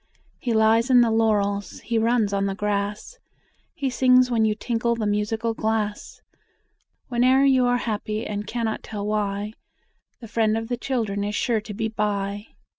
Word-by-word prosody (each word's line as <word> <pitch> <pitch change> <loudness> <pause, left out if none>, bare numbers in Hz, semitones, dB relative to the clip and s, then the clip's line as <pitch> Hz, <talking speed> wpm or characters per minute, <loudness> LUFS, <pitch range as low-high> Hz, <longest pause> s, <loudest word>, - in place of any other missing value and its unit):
He 245 - -2
lies 225 +2 +3
in 250 -1 +7
the 235 -2 +3
laurels, 205 -3 0
he 230 0 -1
runs 225 -2 +1
on 200 0 +1
the 195 - -2
grass, 205 - -3 0.6
He 270 -2 -2
sings 255 0 +4
when 225 -2 +3
you 215 -1 +1
tinkle 235 +1 -1
the 225 -2 -3
musical 215 +2 -1
glass; 220 -1 -3 0.9
Whene'er 255 +3 +4
you 260 -2 +4
are 245 0 +2
happy 215 -1 -3
and 205 0 -4
cannot 225 -1 -2
tell 205 -2 -6
why, 210 0 -2 0.7
The 235 - -10
Friend 220 0 +1
of 225 +1 -5
the 245 - -1
Children 225 -6 -2
is 205 0 -2
sure 230 -2 0
to 210 0 -8
be 220 +1 -1
by! 205 -1 -2
220 Hz, 170 wpm, -24 LUFS, 210-235 Hz, 0.9 s, in